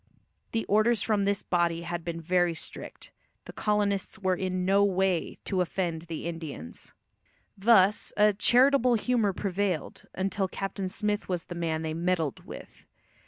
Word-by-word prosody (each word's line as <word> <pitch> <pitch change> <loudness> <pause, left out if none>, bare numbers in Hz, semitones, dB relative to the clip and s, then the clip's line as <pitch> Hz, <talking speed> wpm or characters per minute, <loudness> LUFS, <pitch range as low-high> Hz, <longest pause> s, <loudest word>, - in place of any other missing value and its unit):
The 225 -1 -1
orders 215 +1 +3
from 210 -3 +1
this 200 0 0
body 170 -1 0
had 170 0 -4
been 165 0 -4
very 175 0 +1
strict; - - -7 0.3
the - - -10
colonists 205 -2 0
were 190 -3 0
in 185 0 -2
no 200 +2 +4
way 190 -3 0
to 190 -2 0
offend 175 -2 -2
the 165 -1 -5
Indians. 160 - -7 0.6
Thus 200 -1 +4
a 210 0 +5
"charitable 250 +3 +4
humour 225 -2 +1
prevailed" 190 -4 -2
until 190 +1 -1
Captain 195 0 -4
Smith 210 +1 -2
was 180 -2 -1
the - - -7
man 165 -2 -2
they 160 -1 -2
"meddled" 165 -3 -1
with. - - -11
190 Hz, 150 wpm, -28 LUFS, 170-205 Hz, 0.6 s, a